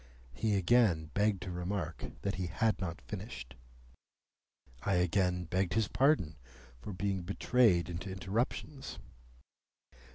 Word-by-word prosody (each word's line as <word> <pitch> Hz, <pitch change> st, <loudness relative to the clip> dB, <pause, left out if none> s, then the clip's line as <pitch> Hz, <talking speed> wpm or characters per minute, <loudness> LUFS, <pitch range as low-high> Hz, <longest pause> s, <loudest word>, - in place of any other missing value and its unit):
He 105 Hz, -, +1 dB
again 95 Hz, -6 st, +3 dB
begged 100 Hz, -3 st, +2 dB
to 95 Hz, -, -5 dB
remark 90 Hz, +2 st, -3 dB, 0.2 s
that 100 Hz, -, 0 dB
he 90 Hz, 0 st, -2 dB
had 110 Hz, +5 st, +1 dB
not 85 Hz, -2 st, -3 dB
finished. 95 Hz, -, -7 dB, 1.3 s
I 100 Hz, -, +1 dB
again 90 Hz, 0 st, +2 dB
begged 90 Hz, +2 st, 0 dB
his 110 Hz, -2 st, +3 dB
pardon 130 Hz, -, +3 dB, 0.4 s
for 105 Hz, -, -7 dB
being 95 Hz, 0 st, -1 dB
betrayed 100 Hz, -1 st, +3 dB
into 90 Hz, +3 st, -5 dB
interruptions. 115 Hz, +8 st, -3 dB
95 Hz, 120 wpm, -33 LUFS, 90-105 Hz, 1.3 s, again